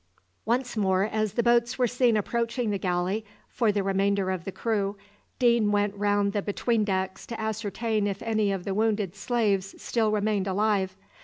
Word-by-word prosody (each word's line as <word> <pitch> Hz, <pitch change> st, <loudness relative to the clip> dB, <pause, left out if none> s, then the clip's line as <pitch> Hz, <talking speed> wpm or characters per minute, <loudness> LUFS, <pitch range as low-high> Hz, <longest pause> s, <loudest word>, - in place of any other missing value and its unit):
Once 245 Hz, +2 st, 0 dB
more, 190 Hz, -3 st, +2 dB
as 215 Hz, -1 st, -1 dB
the 235 Hz, -, +1 dB
boats 235 Hz, 0 st, +3 dB
were 255 Hz, -, +3 dB
seen 245 Hz, -1 st, +2 dB
approaching 235 Hz, +2 st, -1 dB
the 200 Hz, -, -1 dB
galley 180 Hz, +3 st, -1 dB, 0.2 s
for 230 Hz, -4 st, +1 dB
the 200 Hz, -1 st, 0 dB
remainder 195 Hz, 0 st, +1 dB
of 185 Hz, -2 st, -4 dB
the 195 Hz, -, -4 dB
crew, 205 Hz, -2 st, -1 dB, 0.4 s
Deane 235 Hz, -4 st, +3 dB
went 205 Hz, -1 st, +1 dB
round 205 Hz, 0 st, +1 dB
the 205 Hz, -, 0 dB
between 215 Hz, +2 st, 0 dB
decks 190 Hz, -2 st, -2 dB
to 230 Hz, -, -6 dB
ascertain 220 Hz, 0 st, -1 dB
if 195 Hz, -1 st, -4 dB
any 215 Hz, -3 st, +1 dB
of 190 Hz, -2 st, -3 dB
the 195 Hz, -, -2 dB
wounded 210 Hz, -3 st, 0 dB
slaves 205 Hz, -3 st, 0 dB
still 225 Hz, -3 st, 0 dB
remained 210 Hz, -2 st, 0 dB
alive. 195 Hz, -1 st, 0 dB
210 Hz, 175 wpm, -27 LUFS, 195-225 Hz, 0.4 s, boats